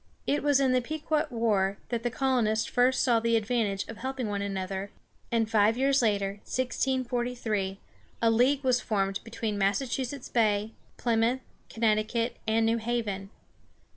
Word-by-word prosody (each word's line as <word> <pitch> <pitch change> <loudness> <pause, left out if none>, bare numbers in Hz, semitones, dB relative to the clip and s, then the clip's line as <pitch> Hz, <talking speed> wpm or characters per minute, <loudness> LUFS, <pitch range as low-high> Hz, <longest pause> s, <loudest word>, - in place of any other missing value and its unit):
It 290 - +1
was 290 -2 +3
in 265 -2 +3
the 255 0 +3
Pequot 310 +3 -1
war 210 -5 +1
that 235 -2 -1
the 240 - -1
colonies 235 -4 +1
first 255 +1 +2
saw 235 -3 +4
the 230 0 +1
advantage 215 -3 -1
of 225 - -8
helping 260 -1 -3
one 200 -1 -2
another, 195 0 -3 0.4
and 230 -1 +2
five 220 +1 +3
years 275 +1 +3
later 200 -3 0
(1643) 245 -6 -1 0.4
a 230 - +5
league 260 +5 +3
was 250 -1 +2
formed 195 -3 -1
between 225 -2 -3
Massachusetts 250 +6 -1
Bay, 215 -2 +1 0.3
Plymouth, 235 +2 +1 0.3
Connecticut, 225 +1 0
and 225 +1 +3
New 225 +1 +2
Haven. 220 -4 -2
230 Hz, 145 wpm, -28 LUFS, 210-255 Hz, 0.4 s, a